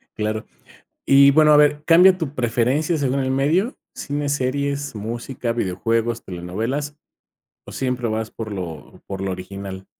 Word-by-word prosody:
Claro. 110 +1 -2 0.6
Y 140 0 +6
bueno, 155 0 +6
a 150 - +7
ver, 150 0 +4
¿cambia 180 +3 +6
tu 155 -5 -5
preferencia 130 +7 +1
según 140 -2 0
el 130 -1 0
medio, 165 - +1 0.2
cine, 145 0 -3
series, 140 0 -1
música, 115 +3 -4
videojuegos, 115 +2 -1
telenovelas, 115 - -4 0.7
o - - -10
siempre 125 -3 -2
vas 110 0 -3
por 110 -2 -7
lo 85 -5 -8
por 95 -1 -6
lo 95 -1 -2
original? 95 +1 -7
125 Hz, 145 wpm, -21 LUFS, 110-145 Hz, 0.7 s, a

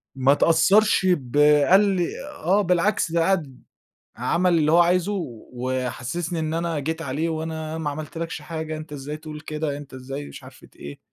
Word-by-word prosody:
ما 135 +1 +3
اتأثّرش 190 +7 +4
ب 145 -6 0 0.3
قال 190 +2 +7
لي 190 -4 +1 0.2
آه 190 +6 +1
بالعكس 180 -1 +1
ده 170 0 +2
قعد 165 -8 -1 0.5
عمل 175 0 +2
اللي 155 0 +2
هو 170 - +6
عايزه، 180 +3 +3 0.4
وحسسني 130 +6 -3
إن 160 0 -2
أنا 165 -1 -1
جيت 160 +3 -3
عليه، 150 +4 -2
"وأنا 160 0 -4
ما 155 -2 -2
عملتلكش 155 +2 -6
حاجة 160 0 -5
أنتَ 155 -1 -9
إزاي 145 +1 -6
تقول 155 -1 -9
كده؟ 155 -1 -3
أنتَ 145 -2 -11
إزاي 135 +2 -6
مش - - -11
عارف - - -15
ت - - -19
إيه؟" 70 0 -9
160 Hz, 175 wpm, -23 LUFS, 145-170 Hz, 0.5 s, قال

